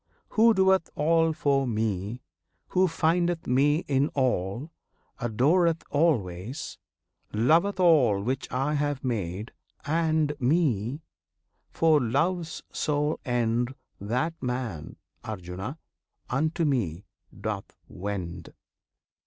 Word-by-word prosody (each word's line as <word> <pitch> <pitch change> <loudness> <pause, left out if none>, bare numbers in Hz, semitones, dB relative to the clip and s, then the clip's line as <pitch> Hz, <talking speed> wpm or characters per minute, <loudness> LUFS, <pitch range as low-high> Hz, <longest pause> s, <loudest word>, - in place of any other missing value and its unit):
Who 225 0 +5
doeth 190 -2 +3
all 165 +2 +3
for 140 -3 +1
Me; 110 0 -2 0.5
who 185 +1 +3
findeth 170 +1 +1
Me 145 +6 +2
In 140 0 +2
all; 125 - 0 0.5
adoreth 160 +9 +2
always; 120 - -1 0.5
loveth 165 - +3
all 135 - +4
Which 130 +4 -2
I 135 +4 0
have 145 -2 -1
made, 105 -3 -3 0.3
and 155 -1 +1
Me, 135 - +1 0.7
for 160 -3 +3
Love's 165 +8 -1
sole 150 +1 0
end 120 0 0 0.2
That 125 +11 -1
man, 125 - -4 0.3
Arjuna! 95 - -6 0.5
unto 155 +5 +1
Me 100 - -1 0.3
doth - - -4 0.2
wend. 90 -4 -5
135 Hz, 95 wpm, -27 LUFS, 110-160 Hz, 0.7 s, Who